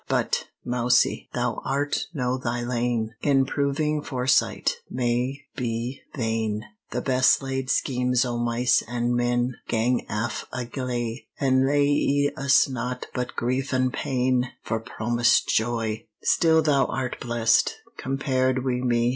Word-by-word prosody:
But, - - 0 0.2
Mousie, 125 0 +2
thou 120 -1 -1
art 140 +2 -1
no 130 -6 -1
thy 120 -1 -2
lane, 120 -2 -1
In 135 -2 +3
proving 145 +2 0
foresight 130 -1 +1
may 125 +2 -1
be 120 0 -3
vain: 110 -3 -1 0.2
The 125 - -2
best 130 +1 +3
laid 135 -1 -3
schemes 125 -2 +1
o' 120 -1 -2
mice 120 +1 +2
an' 120 0 -1
men, 120 +1 0
Gang 120 +2 0
aft 110 +1 -2
a 125 -1 -3
gley, 120 -2 -4
An* 130 -1 +3
lea'e 145 0 +2
us 140 -1 +4
naught 125 -1 -4
but 125 -1 -3
grief 130 +3 -1
an* 130 0 +2
pain, 125 -1 0
For 110 - -1
promised 120 0 +1
joy! 110 -1 0 0.2
Still 160 -1 +4
thou 140 -3 +3
art 130 -1 -3
blest, 115 -2 +2 0.2
compared 130 -1 0
wi' 125 -1 0
me! 120 -1 +2
125 Hz, 135 wpm, -25 LUFS, 120-135 Hz, 0.2 s, us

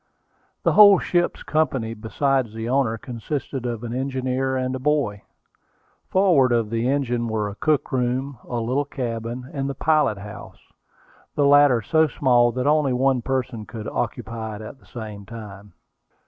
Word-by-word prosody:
The - - +3
whole 205 -2 +8
ship's 175 -1 0
company 135 -7 0
besides 115 +2 -1
the 115 0 -4
owner, 125 -3 +1
consisted 125 +2 -5
of 120 -1 -4
an 120 -1 -4
engineer 130 0 -1
and 130 0 -1
a 130 - -3
boy. 130 -8 0 0.9
Forward 175 -10 +4
of 115 -3 +1
the 115 +2 0
engine 125 -4 0
were 110 -2 -1
a 100 - -6
cook 150 +7 0
room, 130 +1 -1
a 120 - -3
little 125 +5 0
cabin, 120 -2 -5
and 135 -1 -2
the 140 - -4
pilot 150 -7 +2
house, 105 +2 -10 0.8
the 145 - +2
latter 140 -5 +5
so 160 +8 +3
small 120 -3 +3
that 125 +1 -2
only 150 -2 +3
one 130 0 +2
person 125 -4 -3
could 110 -3 -7
occupy 110 -2 -4
it 105 - -8
at 130 +5 -10
the - - -23
same 110 -4 -8
time. 105 -2 -10
125 Hz, 160 wpm, -23 LUFS, 115-140 Hz, 0.9 s, whole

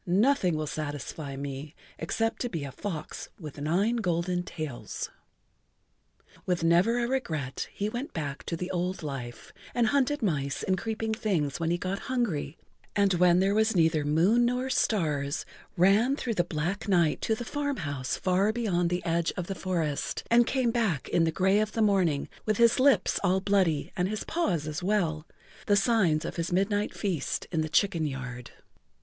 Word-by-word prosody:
Nothing 190 - +3
will 155 - -2
satisfy 145 -1 -5
me 140 +2 -6 0.2
except 225 +7 -1
to 245 - -1
be 165 -9 -4
a 140 - -5
fox 160 -1 -6
with 150 -4 -8
nine 195 +10 +1
golden 175 -3 0
tails." 155 -7 -6 1.4
With 180 -2 0
never 175 +8 +4
a 240 -1 +1
regret 160 - -2
he 205 - -2
went 240 +6 -4
back 145 -3 -4
to 165 - -3
the 180 +2 -4
old 180 0 -2
life, 135 -5 -6 0.2
and 240 -1 +3
hunted 280 0 +1
mice 140 -8 -1
and 190 - +1
creeping 220 +1 -2
things 175 - -1
when 165 -1 0
he 175 - +1
got 185 +3 -3
hungry, 200 - -1 0.4
and 200 -2 +3
when 175 0 +5
there 195 +1 +2
was 220 0 +2
neither 160 -3 +3
moon 170 +11 +3
nor 250 +2 0
stars, 150 - 0 0.3
ran 205 +9 +4
through 245 -5 -2
the 175 - +2
black 175 +5 -3
night 175 -5 +2
to 220 - +1
the 240 - -6
farm 285 +1 -2
house 145 -5 -3
far 190 +3 +2
beyond 195 -7 0
the 175 +1 -2
edge 170 -1 +1
of 180 - -2
the 195 - -3
forest, 170 -6 -2
and 235 0 +6
came 255 -3 +1
back 220 - 0
in 165 - +3
the 165 - +1
gray 190 +4 +3
of 215 0 -1
the - - -3
morning 185 -9 +2 0.2
with 215 -2 0
his 235 +1 +5
lips 260 -8 +4
all 185 +2 +3
bloody 190 -6 +1
and 180 +1 0
his 215 0 -3
paws 180 - -1
as 155 +2 -4
well—the[Pg 175 -5 -3
44] 205 - +5
signs 195 -7 +2
of - - -5
his 170 +1 -2
midnight 205 +3 0
feast 180 -9 -2
in 160 -3 +1
the 155 - -2
chicken 170 -3 +2
yard. 125 -3 -6
180 Hz, 180 wpm, -28 LUFS, 155-215 Hz, 1.4 s, and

